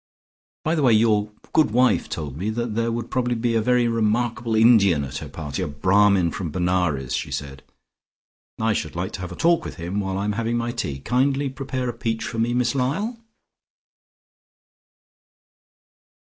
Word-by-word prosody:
By 160 - +1
the 160 - +1
way, 125 -4 +5
your 105 -1 +3 0.2
good 155 -5 +4
wife 125 +3 +2
told 70 -4 -5
me 95 +8 -3
that 120 0 -2
there 115 +1 0
would 115 0 -4
probably 125 -2 0
be 115 0 0
a 115 - +2
very 125 +1 +2
remarkable 115 +1 0
Indian 105 -9 +5
at 65 -1 -5
her - - -8
party, 75 +1 -5
a 90 - -1
Brahmin 90 +4 +3
from 90 -1 -4
Benares, 90 -7 0
she 65 - -2
said. 70 -2 -5 1.0
I 110 0 +2
should 80 -6 -3
like 90 +2 -3
to - - -6
have 90 -1 -6
a - - -7
talk 170 - +2
with - - -7
him 85 +5 -3
while 95 -1 -2
I 100 - -2
am 105 - 0
having 115 +2 -1
my 120 0 -1
tea. 85 - -3
Kindly 135 - +1
prepare 130 -1 -4
a 120 - -2
peach 115 0 -3
for 115 - -4
me, 120 +2 +1
Miss 125 +1 +1
Lyall." 175 - -1
110 Hz, 180 wpm, -23 LUFS, 90-120 Hz, 1.0 s, way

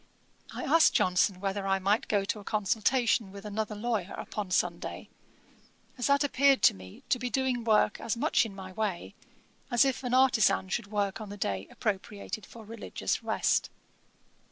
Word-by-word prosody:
I - - -6
asked 325 +3 +4
Johnson 180 +1 +2
whether 195 0 -2
I 195 0 +2
might 200 +3 +1
go 200 -2 +1
to 210 - -2
a - - -11
consultation 220 +1 +1
with 200 +1 -10
another 210 +1 -3
lawyer 210 -3 -2
upon 205 -3 -5
Sunday, 175 -1 -2 0.9
as 250 - -1
that 280 +1 +3
appeared 280 -1 +3
to - - +7
me 95 -1 -13
to 250 - +2
be 250 +1 -3
doing 255 -2 0
work 215 -2 +2
as 230 - -2
much 295 +6 +2
in 215 -4 -7
my 190 -1 -8
way, 200 -3 -3 0.6
as 240 +1 +4
if 270 -1 -1
an 250 0 0
artisan 225 -8 +3
should 205 +3 -2
work 205 +1 -2
on 215 - -7
the 205 - -8
day 100 - -2
appropriated 210 -1 -4
for 225 -2 -12
religious 225 +1 -3
rest. - - +1
210 Hz, 175 wpm, -29 LUFS, 195-240 Hz, 0.9 s, to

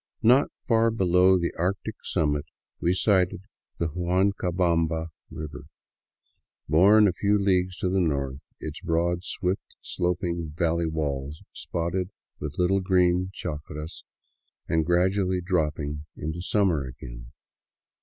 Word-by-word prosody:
Not 130 +5 +5 0.2
far 115 -1 +4
below 95 -3 +4
the 85 -1 -1
arctic 100 +5 -1
summit 75 -4 0 0.3
we 85 - +2
sighted 95 -1 +2 0.3
the 85 - -1
Huancabamba 85 -2 +1 0.2
river, 75 -1 -7 1.0
born 100 +7 +6
a 95 - +1
few 100 +3 +2
leagues 95 -2 +1
to - - -1
the 95 +1 +1
north, 70 -6 -1 0.2
its 75 0 -6
broad, 85 0 0
swift 95 0 -3
sloping 85 -3 -2
valley 85 0 +1
walls 75 -2 -3
spotted 85 +2 -2 0.3
with 75 -1 -5
little 95 +2 +2
green 90 -1 +2
chacras, 75 -2 -6 0.6
and 80 -1 +1
gradually 95 +1 +2
dropped 85 -4 0 0.4
into 80 +3 -4
summer 90 -6 +2
again. - - -10
90 Hz, 115 wpm, -26 LUFS, 80-95 Hz, 1.0 s, born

